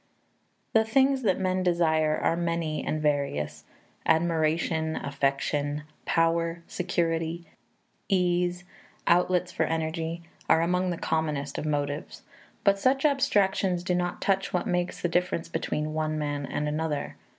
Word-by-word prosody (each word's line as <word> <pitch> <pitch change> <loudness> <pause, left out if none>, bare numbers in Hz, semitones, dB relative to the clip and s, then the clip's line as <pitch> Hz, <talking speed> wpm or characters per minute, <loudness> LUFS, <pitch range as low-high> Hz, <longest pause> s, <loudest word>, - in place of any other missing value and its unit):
The 220 - +5
things 265 +4 +3
that 195 -6 +1
men 185 0 0
desire 160 -3 +2
are - - +1
many 170 -2 -1
and 155 - -1
various: 140 - -1 0.4
admiration, 160 -1 +1
affection, 145 +1 -1 0.2
power, 165 0 +1
security, 170 -1 -1 0.6
ease, 180 -1 +1 0.4
outlets 180 +1 +3
for 165 - -3
energy, 165 +1 -2 0.3
are 165 - +5
among 180 +2 +1
the 175 - -2
commonest 150 -4 -1
of 155 - -3
motives. 145 0 -3 0.4
But 200 -1 +4
such 270 +5 +2
abstractions 200 -10 +2
do 180 - 0
not 175 0 -1
touch 195 0 +1
what 180 - 0
makes 180 0 -1
the - - 0
difference 175 -1 0
between 155 -1 -2
one 155 0 -1
man 145 -2 -2
and 150 - -2
another. 150 -1 -2
165 Hz, 130 wpm, -27 LUFS, 155-180 Hz, 0.6 s, The